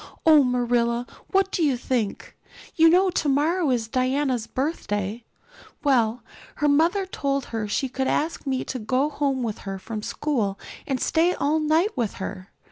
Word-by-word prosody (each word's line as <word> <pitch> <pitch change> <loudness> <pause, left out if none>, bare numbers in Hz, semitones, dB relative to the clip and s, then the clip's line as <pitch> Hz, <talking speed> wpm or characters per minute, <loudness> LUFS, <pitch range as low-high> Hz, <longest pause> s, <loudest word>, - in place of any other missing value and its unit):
"Oh, 310 -3 +7
Marilla, 240 -1 +1 0.2
what 390 0 +1
do - - -1
you 275 -5 +2
think? 240 -4 -3 0.4
You 325 0 +6
know 370 +2 +4
tomorrow 310 +3 +1
is 235 -3 0
Diana's 255 -1 0
birthday. 225 - -3 0.6
Well, 240 -5 +2 0.3
her 295 - +1
mother 335 +7 +3
told 275 -7 -2
her 220 -2 -2
she 265 +6 -1
could 265 +1 -2
ask 310 -1 -1
me 260 -1 0
to 255 - -5
go 255 +7 0
home 275 -3 -1
with 220 -3 -3
her 195 -1 -5
from 215 +3 -6
school 215 -6 -1 0.3
and 265 -2 -1
stay 335 +6 +2
all 300 +3 +1
night 315 +7 +2
with 235 -5 -1
her. 190 0 -7
265 Hz, 160 wpm, -24 LUFS, 235-305 Hz, 0.6 s, Oh